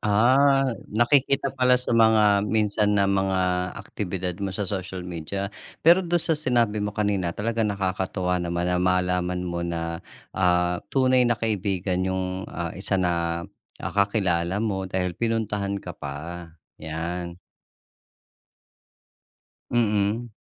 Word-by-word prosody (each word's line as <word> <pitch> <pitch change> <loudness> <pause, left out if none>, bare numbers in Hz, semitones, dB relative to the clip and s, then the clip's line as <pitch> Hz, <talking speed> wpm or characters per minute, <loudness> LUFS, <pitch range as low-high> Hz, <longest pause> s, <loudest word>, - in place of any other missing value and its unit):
Ah, 130 +5 +4 0.2
nakikita 135 +4 +2
pala 125 0 +4
sa 125 -1 -2
mga 110 -3 +5
minsan 105 -1 +2
na 100 - +4
mga 95 -1 +1 0.4
aktibidad 90 -2 -4
mo 100 - -1
sa 100 +2 -3
social 95 -1 -4
media. 90 +4 -4 0.3
Pero 170 +3 +7
do'n 175 -1 0
sa - - +1
sinabi 120 -8 +1
mo 105 0 -3
kanina, 100 -4 0
talagang 115 +1 0
nakakatuwa 95 -2 -1
naman 85 0 -2
na 90 - +1
malaman 90 0 +1
mo 85 -1 -3
na, 85 -1 -3 0.3
ah, 90 -1 +2
tunay 130 -2 +3
na 120 - +2
kaibigan 95 -4 -1
'yong 95 +1 -3
ah 85 -1 -4
isa 95 +1 -2
na 85 -2 0 0.4
ah - - -3
kakilala 100 -2 +1
mo 95 -3 -2
dahil 90 -1 -1
pinuntahan 105 -2 -1
ka - - -6
pa. 85 +5 -7 0.3
'Yan. 85 +2 -4 2.3
Mm. 110 0 +1
100 Hz, 125 wpm, -25 LUFS, 90-110 Hz, 2.3 s, Pero